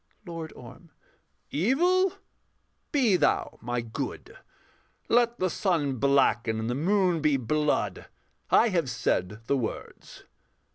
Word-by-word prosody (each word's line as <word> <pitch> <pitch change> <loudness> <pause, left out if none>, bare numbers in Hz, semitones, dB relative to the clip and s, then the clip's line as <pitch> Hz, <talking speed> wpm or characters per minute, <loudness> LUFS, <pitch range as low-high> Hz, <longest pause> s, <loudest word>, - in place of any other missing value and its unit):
LORD 165 -3 -6
ORM. 125 +8 -13 0.6
Evil, 350 - +2 0.8
be 240 -10 +3
thou - - 0
my 120 +1 -2
good; 115 -1 -6 0.7
Let 235 0 +3
the 185 - +1
sun 155 -8 0
blacken 120 -4 +2
and 110 - -3
the - - 0
moon 180 +3 +1
be 150 -2 +3
blood: 150 +5 -1 0.4
I 235 - +5
have 170 -9 0
said 115 -2 -2
the 140 - +1
words. 115 -4 -6
155 Hz, 115 wpm, -27 LUFS, 120-195 Hz, 0.8 s, I